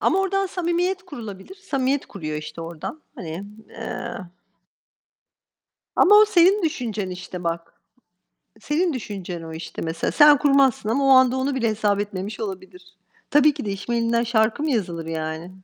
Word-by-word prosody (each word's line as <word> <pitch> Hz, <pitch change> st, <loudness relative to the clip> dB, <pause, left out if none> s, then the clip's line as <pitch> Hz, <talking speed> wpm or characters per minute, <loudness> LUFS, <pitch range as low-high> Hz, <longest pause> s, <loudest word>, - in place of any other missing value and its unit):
Ama 385 Hz, -, +2 dB
oradan 390 Hz, 0 st, 0 dB
samimiyet 360 Hz, +1 st, -1 dB
kurulabilir. 230 Hz, -, -9 dB
Samimiyet 275 Hz, -8 st, -1 dB
kuruyor 155 Hz, -5 st, -5 dB
işte 150 Hz, +2 st, -7 dB
oradan. 170 Hz, -, -7 dB
Hani, 170 Hz, +2 st, -6 dB, 0.2 s
eee 235 Hz, +1 st, -6 dB, 1.8 s
Ama 415 Hz, +3 st, +6 dB
o 425 Hz, -, +8 dB
senin 385 Hz, 0 st, +4 dB
düşüncen 220 Hz, -, -2 dB
işte 180 Hz, 0 st, -7 dB
bak. 170 Hz, 0 st, -3 dB, 0.9 s
Senin 325 Hz, +6 st, 0 dB
düşüncen 190 Hz, -8 st, -6 dB
o, 160 Hz, 0 st, -8 dB
işte, 160 Hz, +1 st, -7 dB
mesela. 165 Hz, 0 st, -2 dB
Sen 295 Hz, -2 st, +7 dB
kurmazsın 275 Hz, -6 st, +3 dB
ama 275 Hz, +5 st, +1 dB
o -, -, +3 dB
anda 260 Hz, -1 st, +6 dB
onu 265 Hz, +1 st, -1 dB
bile 235 Hz, -3 st, +1 dB
hesap 210 Hz, -2 st, +1 dB
etmemiş 205 Hz, +1 st, -5 dB
olabilir. 185 Hz, -2 st, -8 dB, 0.3 s
Tabii 295 Hz, 0 st, +5 dB
ki -, -, -6 dB
de 200 Hz, -, -2 dB
iş 195 Hz, +4 st, -7 dB
mail'inden 235 Hz, 0 st, +1 dB
şarkı 225 Hz, +4 st, +1 dB
mı 310 Hz, -, 0 dB
yazılır 175 Hz, -8 st, -2 dB
yani? 160 Hz, +1 st, -4 dB
230 Hz, 155 wpm, -23 LUFS, 185-295 Hz, 1.8 s, o